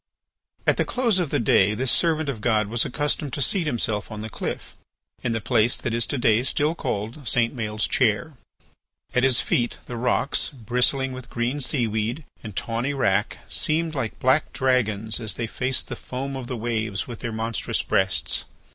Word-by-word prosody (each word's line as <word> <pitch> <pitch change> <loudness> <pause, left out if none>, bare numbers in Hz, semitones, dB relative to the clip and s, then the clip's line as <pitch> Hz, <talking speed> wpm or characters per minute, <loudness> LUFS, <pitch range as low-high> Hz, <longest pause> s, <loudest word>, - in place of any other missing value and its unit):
At - - +3
the - - +3
close 235 -6 +1
of 175 -5 0
the - - +1
day 105 -2 +4
this 130 +3 +2
servant 160 -3 +2
of 125 -6 -3
God 110 -1 +2
was 115 +3 +1
accustomed 145 0 -1
to 145 - -2
seat 180 0 +2
himself 110 -6 -1
on 105 -1 -5
the 110 0 -6
cliff, - - -5 0.5
in 120 - 0
the 115 - 0
place 115 +1 +3
that 120 - -3
is 115 0 +2
to 140 - -1
day 115 -2 +4
still 145 +4 +1
called 115 -1 -4
St. 120 +2 +2
Maël's 110 -2 -1
chair. 130 +7 +1 0.8
At 125 - +3
his 130 -2 +4
feet 120 -1 0
the 120 - -6
rocks 125 +3 +1
bristling 130 +2 0
with 130 -1 -9
green 120 +4 -1
seaweed 120 +1 -1 0.2
and 105 -4 -8
tawny 120 +5 -1
wrack 105 -5 0
seemed 160 +1 +1
like 135 -7 -3
black 130 +4 +3
dragons 115 -5 +1
as 110 -5 -2
they 115 - -2
faced 130 +3 -2
the - - -5
foam 135 +2 -5
of 130 -2 -5
the 125 - -3
waves 110 -3 -2
with 120 -2 -7
their 120 - -4
monstrous 110 +1 -1
breasts. 95 -1 +1
120 Hz, 185 wpm, -24 LUFS, 110-135 Hz, 0.8 s, day